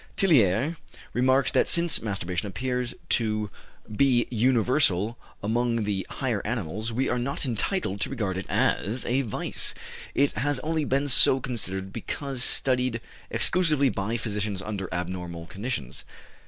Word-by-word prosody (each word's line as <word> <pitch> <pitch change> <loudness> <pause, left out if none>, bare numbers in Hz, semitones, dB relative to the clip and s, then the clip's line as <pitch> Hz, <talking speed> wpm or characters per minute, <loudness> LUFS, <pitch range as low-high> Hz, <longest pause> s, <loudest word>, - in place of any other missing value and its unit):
" - - -29
Tillier 140 - +3 0.4
remarks 130 +2 +3
that - - +3
since 170 -4 +4
masturbation 100 -3 -2
appears 125 +3 -2
to 110 -3 +1 0.4
be 125 -1 +4
universal 115 -3 +2 0.3
among 115 +1 +1
the 100 -2 -2
higher 120 -7 -2
animals 110 0 -3
we 130 +4 0
are 120 - 0
not 140 +4 -2
entitled 120 - -1
to - - 0
regard 105 -8 -2
it 95 - -5
as 115 +7 +1
a 130 +3 +1
vice; 115 -6 -3 0.4
it 140 +1 +3
has 145 +1 0
only 160 -1 -1
been 140 +2 +1
so 130 0 +6
considered 95 -7 -3
because 135 -3 -2
studied 125 -3 +1 0.3
exclusively 155 -6 +3
by 110 +2 -2
physicians 105 -3 -3
under 95 -2 -4
abnormal 90 -1 -4
conditions. 95 - -5
120 Hz, 140 wpm, -26 LUFS, 100-130 Hz, 0.4 s, so